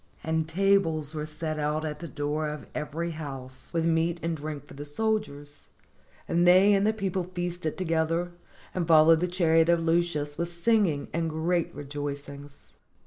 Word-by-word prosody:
And 160 0 -1
tables 165 -5 +2
were 150 -1 -4
set 155 0 -4
out 150 +1 -1
at 150 -1 -4
the 170 - -6
door 150 +1 -2
of 150 -1 -6
every 160 +3 -3
house, 135 -5 -8
with 165 -1 0
meat 165 +1 +1
and 165 0 -1
drink 150 -1 -6
for - - -14
the 145 - -7
soldiers, 145 -4 -3 0.6
and 175 +1 +2
they 190 +3 +7
and 200 +1 +3
the - - +4
people 195 -4 -2
feasted 175 -2 -3
together, 165 0 0 0.4
and 175 -3 -1
followed 160 0 +7
the 180 - 0
chariot 165 -2 +3
of 170 -1 +3
Lucius 165 -3 0
with 170 0 -1
sing 205 +5 +2
ing 145 -3 -3
and 165 0 0
great 165 +2 0
rejoicings. 145 0 -7
160 Hz, 170 wpm, -27 LUFS, 150-175 Hz, 0.6 s, they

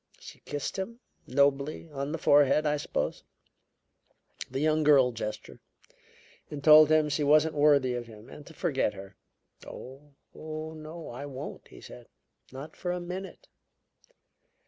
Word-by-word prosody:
She - - -12
kissed 145 +4 -5
him 230 +5 -5 0.3
nobly 140 +4 +1
on 140 0 -4
the 165 - -2
forehead, 145 0 +4
I 150 0 +1
suppose - - -3 1.3
the - - -4
young 155 +1 +2
girl 140 -4 +5
gesture; 110 -2 -7 0.9
and 145 -1 -7
told 155 0 +8
him 155 -1 +4
she 150 0 -1
wasn't 155 +2 +4
worthy 145 -4 +3
of 120 -1 -5
him 110 -1 -14
and 150 - -12
to 165 - -12
forget 140 - -1
her. 95 0 -11 0.5
"'Oh, 135 +3 -11 0.2
no, 155 +1 -8
I 135 +4 -7
won't,' 135 -2 -8
he - - -15
said. - - -12 0.4
'Not 135 +4 -9
for 180 - -3
a 180 - -2
minute! 185 - -8
150 Hz, 145 wpm, -28 LUFS, 135-155 Hz, 1.3 s, told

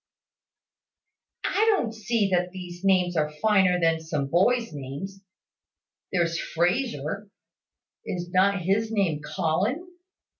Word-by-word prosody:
"I 430 +2 +3
don't 225 -2 -2
see 220 -2 0
that 180 0 +2
these 180 -1 -9
names 185 -2 +3
are 150 -2 +1
finer 185 +2 +3
than 165 -1 +2
some 160 -3 -2
boys' 230 - +2
names. 145 +8 -7 0.9
There's 170 -2 +1
Frazer, 180 - -1 0.7
is 175 -1 -5
not 190 0 +3
his 210 +5 +1
name 185 -9 0
Colin? 195 - -1
185 Hz, 110 wpm, -26 LUFS, 165-210 Hz, 0.9 s, I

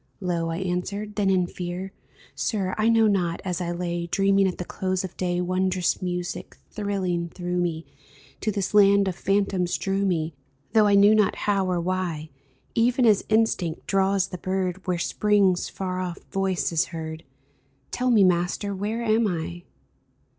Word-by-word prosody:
Low 170 -3 -1
I 165 - -2
answered, 190 +3 -3
then, 200 -2 +1
in 185 -2 +3
fear: 180 +2 -5 0.2
" - - -25
Sir, 195 -4 -1
I 215 +1 +2
know 225 -1 +5
not; 180 -5 +1
as 180 -1 -2
I 175 - -2
lay 175 0 -3
Dreaming 195 +2 +3
at 185 - -3
the 180 - -5
close 185 +1 -2
of 190 - -7
day, 175 -1 -1
Wondrous 185 0 0
music, 180 -1 -4
thrilling 185 -5 -2
through 180 +1 -4
me, 170 -2 -1 0.5
To 215 - -1
this 200 -1 -2
land 200 -1 +5
of 185 - -2
phantoms 195 -2 0
drew 195 0 -1
me, 165 -4 0 0.4
Though 215 -2 +5
I 200 - +4
knew 200 +2 +7
not 215 -2 +3
how 195 -2 +1
or 180 -1 0
why, 170 -4 -2 0.4
Even 245 +2 +3
as 210 -3 +4
instinct 215 -7 +1
draws 195 0 +1
the 180 - -7
bird 185 0 -2
Where 180 -1 +1
Spring's 200 0 +2
far 185 -1 -4
off 180 -1 -3
voice 195 -2 0
is 165 -2 +2
heard. 160 -1 -7 0.7
Tell 250 0 0
me, 220 -5 +5
Master, 180 +3 +1
where 210 +4 -3
am 220 0 +2
I 175 -1 -4
185 Hz, 170 wpm, -25 LUFS, 175-200 Hz, 0.7 s, knew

